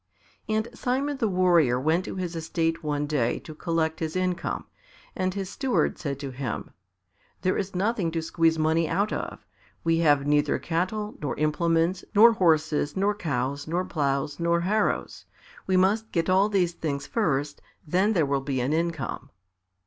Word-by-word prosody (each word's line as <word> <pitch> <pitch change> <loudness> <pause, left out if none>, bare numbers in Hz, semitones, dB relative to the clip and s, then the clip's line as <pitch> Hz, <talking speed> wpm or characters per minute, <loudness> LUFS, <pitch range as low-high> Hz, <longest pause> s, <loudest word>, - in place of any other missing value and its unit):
And 215 +1 0
Simon 270 +4 -1
the 230 - +1
Warrior 175 -9 +3
went 160 +7 +1
to - - -5
his 180 -2 -4
estate 165 0 -1
one 150 -1 -1
day 140 -6 0
to 155 - -10
collect 160 0 -1
his 160 0 -3
income, 185 -1 -1 0.5
and 185 -1 0
his 195 -2 -3
steward 260 +6 0
said 140 -4 -3
to 140 -2 -5
him, 130 -2 -5 0.7
"There 185 - +2
is 195 -1 -3
nothing 195 -2 0
to 165 - -1
squeeze 165 0 +2
money 160 +1 +2
out 200 +5 0
of; - - -5 0.4
we 165 0 +2
have 145 -4 +3
neither 145 0 +2
cattle, 200 +6 -2
nor 145 - -3
implements, 165 +4 +1
nor 230 +3 +8
horses, 155 -6 +1
nor 200 +2 +2
cows, 140 -7 -2
nor 175 +3 -1
ploughs, 140 -2 -1
nor 170 0 +2
harrows; 210 +5 -1 0.4
we 190 -1 +3
must 210 +4 +2
get 165 +1 0
all 195 +3 +4
these 180 -4 +1
things 145 -4 -3
first, 145 - -1 0.2
then 185 +7 +2
there 165 -7 +3
will 140 -1 0
be 135 -1 -2
an 130 +4 0
income." 160 -6 -2
165 Hz, 165 wpm, -26 LUFS, 150-185 Hz, 0.7 s, nor